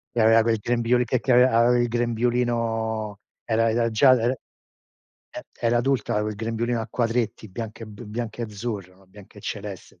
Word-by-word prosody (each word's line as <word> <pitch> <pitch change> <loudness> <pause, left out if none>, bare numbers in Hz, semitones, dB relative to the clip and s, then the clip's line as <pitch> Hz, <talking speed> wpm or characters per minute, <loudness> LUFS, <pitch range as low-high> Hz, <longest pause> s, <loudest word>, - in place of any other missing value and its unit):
Che 120 - +2
aveva 115 +1 +6
quel 115 -1 +1
grembiuli 120 +2 +1
che 125 +1 0
che 130 - -1
ave 125 - +7
aveva 120 0 +4
il 120 0 +2
grembiulino, 115 -3 -1 0.2
era 115 0 +1
era 115 +1 +1
già 130 +5 +5
el 120 -1 +3
e 130 - -12 1.0
era 120 0 +2
adulta, 130 -2 0
aveva 105 0 0
il 105 - -4
grembiulino 115 +2 -2
a 110 - -4
quadretti, 115 -2 -1
bianco 110 +3 -7
e - - -7
b 105 +3 -11
bianco 115 +2 -5
e 115 - -1
azzurro, 105 -4 -6
no, 95 0 -23
bianco 100 +1 -16
e - - -11
celeste. 100 -2 -7
115 Hz, 190 wpm, -24 LUFS, 110-120 Hz, 1.0 s, ave